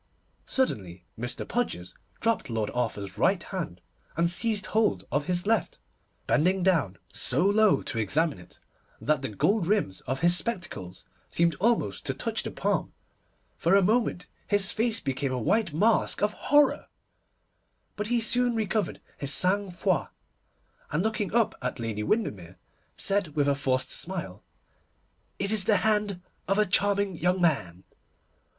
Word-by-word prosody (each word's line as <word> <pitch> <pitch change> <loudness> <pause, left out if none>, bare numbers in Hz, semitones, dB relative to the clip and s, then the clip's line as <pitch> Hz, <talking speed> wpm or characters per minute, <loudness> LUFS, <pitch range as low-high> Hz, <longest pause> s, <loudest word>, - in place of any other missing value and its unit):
Suddenly 95 - -2
Mr. 120 +2 -4
Podgers 160 - -2 0.3
dropped 225 - 0
Lord 110 -2 -2
Arthur's 105 -5 -3
right 190 +3 +2
hand, 170 - -5 0.4
and 170 +1 +2
seized 210 +2 +2
hold 210 - +1
of 145 +3 0
his 180 0 0
left, 220 -3 +1 0.5
bending 180 +4 +2
down 160 - +2 0.2
so 175 - +1
low 210 +1 +4
to 115 - -3
examine 145 - +1
it 90 - -16 0.4
that 150 -3 +1
the 135 - -3
gold 175 - +1
rims 195 - 0
of 130 +2 -2
his 175 +1 +6
spectacles 170 - -3 0.2
seemed 170 0 +2
almost 210 - +1
to - - 0
touch - - -2
the - - -5
palm. - - -1 0.7
For 170 +4 +3
a 200 - +5
moment 215 -3 +1 0.2
his 205 -2 +2
face 225 0 0
became 135 -1 -2
a 130 - -1
white 195 - +1
mask 205 +7 +2
of 210 - +2
horror, 290 0 +3 1.1
but 210 0 -3
he 240 +1 +2
soon 245 +1 +1
recovered 215 -3 -1 0.2
his 140 -1 -1
sang 195 +5 +2
froid, 180 -2 0 0.8
and 150 +4 0
looking 220 -3 -1
up 230 -1 +2
at 125 +1 -3
Lady 115 -2 -3
Windermere, 100 - -2 0.4
said 195 -6 0
with 145 -2 +2
a 140 - +4
forced 130 -2 -1
smile, 170 - -2 1.0
'It 200 +1 -1
is 215 -3 +3
the 210 - +4
hand 210 -4 +1 0.3
of 195 +2 +1
a 210 - +4
charming 200 0 +1
young 180 +3 +1
man. 95 - 0
180 Hz, 150 wpm, -27 LUFS, 130-210 Hz, 1.1 s, his